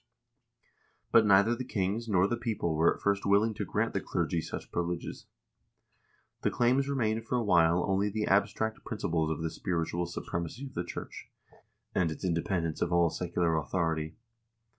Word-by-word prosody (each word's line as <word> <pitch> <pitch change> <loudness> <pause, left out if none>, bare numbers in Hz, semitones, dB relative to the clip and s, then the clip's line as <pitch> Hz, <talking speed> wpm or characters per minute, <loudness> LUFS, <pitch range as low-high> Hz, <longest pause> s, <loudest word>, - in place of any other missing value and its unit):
But 110 -2 +6
neither 100 +4 +5
the 130 - -4
kings 110 0 -2
nor 95 -2 +4
the 120 - 0
people 115 -8 -2
were 80 +2 +4
at - - -15
first 100 0 +1
willing 105 +3 +3
to - - -4
grant - - -1
the - - -1
clergy 85 - -1
such - - -7
privileges. 85 0 -3 1.1
The - - +2
claims 130 +3 +2
re 140 - 0
mained 110 -3 0
for 125 - -1
a 120 - +1
while 85 -3 +4
only 95 +2 +1
the 105 +1 -1
abstract 110 +3 +1
principles 80 -8 -1
of 80 +1 -2
the 80 - -2
spiritual 85 -1 -2
su 85 - -5
premacy 85 - -4
of 130 - -13
the 85 - -2
church, - - -8 0.6
and 85 -3 +2
its 80 +3 -5
independence 85 -1 -1
of 85 - 0
all 85 -2 +3
secular 85 -2 0
authority. 80 0 -1
95 Hz, 175 wpm, -30 LUFS, 85-110 Hz, 1.1 s, But